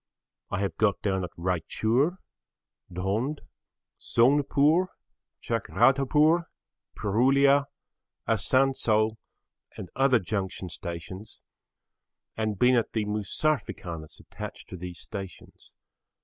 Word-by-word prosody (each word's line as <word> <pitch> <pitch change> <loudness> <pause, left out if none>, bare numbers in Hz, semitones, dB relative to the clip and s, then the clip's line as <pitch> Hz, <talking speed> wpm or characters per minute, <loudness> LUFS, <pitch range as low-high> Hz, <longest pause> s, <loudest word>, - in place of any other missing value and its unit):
I 100 - -2
have 100 -4 -2
got 105 -3 +2
down 95 -2 0
at 90 - -4
Raichur, 110 - 0 0.7
Dhond, 105 - -2 0.6
Sonepur, 145 +7 +3 0.6
Chakradharpur, 135 - +3 0.5
Purulia, 135 +6 +3 0.6
Asansol 110 -5 +2 0.6
and 90 - -8
other 135 -1 +4
junction 95 -2 -4
stations 85 +5 -8 1.0
and 110 -2 -2
been 125 +5 +4
at 120 -2 +1
the 110 -2 0
'Mosafirkhanas' 105 - -3
attached - - -9
to - - -7
these 90 -1 -7
stations. 95 -4 -10
110 Hz, 90 wpm, -27 LUFS, 95-135 Hz, 1.0 s, other